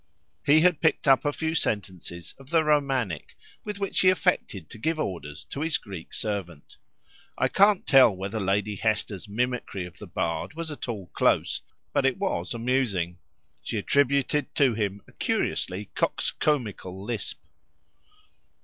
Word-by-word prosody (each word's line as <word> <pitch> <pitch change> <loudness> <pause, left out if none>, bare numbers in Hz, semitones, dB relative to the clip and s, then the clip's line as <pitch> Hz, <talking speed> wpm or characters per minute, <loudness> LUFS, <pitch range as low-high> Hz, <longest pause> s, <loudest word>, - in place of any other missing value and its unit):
He 150 +2 +6
had 180 -2 +4
picked 160 -1 +2
up 135 -1 +5
a 145 - +3
few 160 +2 -2
sentences 95 - -2
of 135 0 -14
the 165 -1 +4
Romantic, 135 - 0 0.3
with 210 -1 -5
which 200 -1 -1
he 185 - +6
affected 180 - 0
to 115 - -10
give 160 +7 0
orders 85 - -4
to 140 - -5
his 160 -1 +1
Greek 95 -6 -9
servant. 95 -8 -5 0.6
I - - +3
can't 200 0 +4
tell 135 -3 +7
whether 100 +2 -4
Lady 100 +1 0
Hester's 110 -2 -1
mimicry 120 -4 -2
of 90 - -12
the - - -9
bard 85 - -2
was 165 -1 -4
at 145 - -6
all 100 -7 -5
close, - - +2 0.3
but - - +2
it 130 - 0
was 195 -9 -2
amusing; 115 -8 0 0.4
she 110 - -3
attributed 140 +4 +1
to 135 -4 +4
him 100 -2 -2
a - - -17
curiously 95 +3 -2
coxcombical 105 -10 -1
lisp. 115 -2 -3
115 Hz, 150 wpm, -27 LUFS, 95-150 Hz, 0.6 s, tell